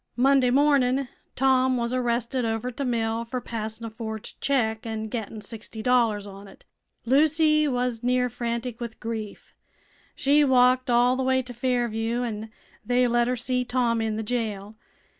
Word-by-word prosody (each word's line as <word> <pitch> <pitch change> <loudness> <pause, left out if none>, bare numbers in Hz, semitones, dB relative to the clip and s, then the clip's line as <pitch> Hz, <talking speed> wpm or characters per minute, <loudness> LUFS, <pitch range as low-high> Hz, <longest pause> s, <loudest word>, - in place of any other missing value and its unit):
Monday 265 0 +4
mornin' 270 -1 +3 0.3
Tom 260 -1 +3
was 235 0 -1
arrested 245 0 0
over 225 +2 -2
t' - - -23
the 280 - -2
mill 230 -2 -1
fer 250 +2 -4
passin' 225 -1 -5
a - - -4
forged 220 -1 -7
check 225 -5 0
an' 220 -2 -4
gettin' 220 -1 -5
sixty 220 0 -8
dollars 230 -5 +2
on 200 0 -11
it. 195 - -17 0.4
Lucy 305 +3 +3
was 250 -3 -1
near 250 0 +1
frantic 235 0 -4
with 235 -2 -6
grief. 220 -2 -6 0.6
She 290 +2 +3
walked 255 -1 +4
all 245 +1 +4
the 260 - -2
way 260 0 +1
to 250 0 -9
Fairview, 240 -1 -1
an' 220 -2 -4 0.3
they 245 0 +2
let 240 0 +2
her 250 - 0
see 250 +1 -1
Tom 245 -2 0
in 220 -1 -1
the 220 - -3
jail. 215 -3 -3
240 Hz, 165 wpm, -25 LUFS, 225-255 Hz, 0.6 s, Monday